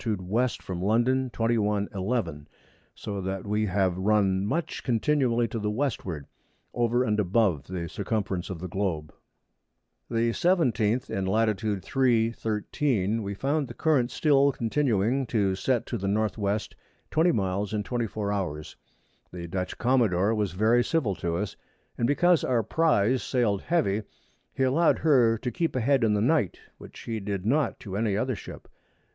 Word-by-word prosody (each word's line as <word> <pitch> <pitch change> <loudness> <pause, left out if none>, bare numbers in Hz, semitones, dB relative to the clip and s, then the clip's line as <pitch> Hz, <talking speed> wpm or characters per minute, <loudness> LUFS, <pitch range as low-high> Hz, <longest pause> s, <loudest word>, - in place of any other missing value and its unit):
W. 110 +2 0 0.2
from 90 -2 -5
London. 120 +6 +2
21. 105 -3 0
11. 95 -7 -2 0.5
So 100 -2 -5
that 95 +1 -4
we 105 +1 0
have 95 -2 +1
run 95 -1 +2
much 155 +12 -2
continually 120 -1 +1
to 115 - -3
the 105 0 -1
Westward, 105 - -3 0.5
over 120 +1 +1
and 105 -3 0
above 95 -6 +1
the 90 -2 -4
Circumference 100 -2 -3
of 95 - -4
the 90 +3 -6
Globe. 90 -5 -3 1.0
The 115 0 +1
17th 130 - +1
in 95 -1 -2
Lat. 110 0 +1 0.2
3. 120 -4 +2
13. 110 -1 -1
we 100 -1 -4
found 140 +5 -1
the 120 - -9
Current 145 -7 +2
still 140 -2 +3
continuing 120 0 0
to 100 -4 +1
set 120 +4 0
to 120 - -4
the 100 - -3
N.W. 105 0 0 0.5
20 165 +3 +3
Miles 100 -1 -1
in 105 -1 -1
24 110 -3 -2
Hours. 80 -7 -4 0.6
The 85 -1 -7
Dutch 90 +2 -4
Commadore 115 -5 +2
was 105 -4 -1
very 110 +5 +3
civil 130 -8 0
to 85 -2 -2
us, 105 +2 -3 0.4
and 115 - 0
because 175 +4 +3
our 120 -3 +1
Prize 130 -3 +2
sailed 110 -7 0
heavy, 120 - +1 0.5
he 135 - -1
allow'd 145 +6 +3
her 125 -8 +4
to 125 +3 -4
keep 165 0 -2
a - - +1
head 135 +1 +2
in 105 -2 +3
the 100 - +1
Night, 125 - +1 0.2
which - - -12
he 115 -1 -4
did 100 -2 -4
not 140 +6 +1
to 95 -2 -6
any 105 -1 0
other 130 +3 -1
Ship. - - -10
110 Hz, 160 wpm, -27 LUFS, 100-125 Hz, 1.0 s, her